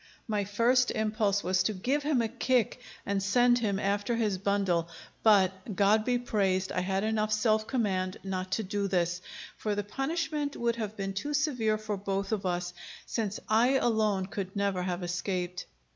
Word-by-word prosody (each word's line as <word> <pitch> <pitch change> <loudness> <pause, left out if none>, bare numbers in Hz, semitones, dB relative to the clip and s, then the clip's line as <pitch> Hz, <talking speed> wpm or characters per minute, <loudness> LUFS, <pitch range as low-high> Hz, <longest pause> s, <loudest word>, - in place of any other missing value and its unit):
My 210 -3 0
first 240 +5 +3
impulse 215 -2 0
was 185 +1 +2
to 215 +3 0
give 265 +10 0
him 285 -5 +1
a - - 0
kick 245 0 0 0.2
and 200 -1 0
send 245 +5 +4
him 205 -4 0
after 205 +3 0
his 210 -5 0
bundle; 190 -4 +1 0.3
but 195 -1 +3
God 210 +2 +4
be 250 -1 +2
praised, 195 -6 0
I - - 0
had 190 +2 0
enough 215 -1 0
self 215 0 +2
command 190 -7 -1
not 185 -1 -3
to 220 - 0
do 200 0 -1
this, 175 -1 0 0.4
for 210 -1 -1
the 205 - -1
punishment 295 - -2
would 235 0 0
have 215 -2 -4
been 195 -1 -3
too 290 +10 -2
severe 250 -8 +1
for 215 -1 -4
both 195 +1 -2
of 200 -3 -1
us, 175 0 -2 0.3
since 215 -3 -2
I 235 +5 +4
alone 215 -6 +1
could 190 0 -5
never 200 -2 0
have 180 0 -2
escaped. 180 0 -3
205 Hz, 175 wpm, -29 LUFS, 190-230 Hz, 0.4 s, send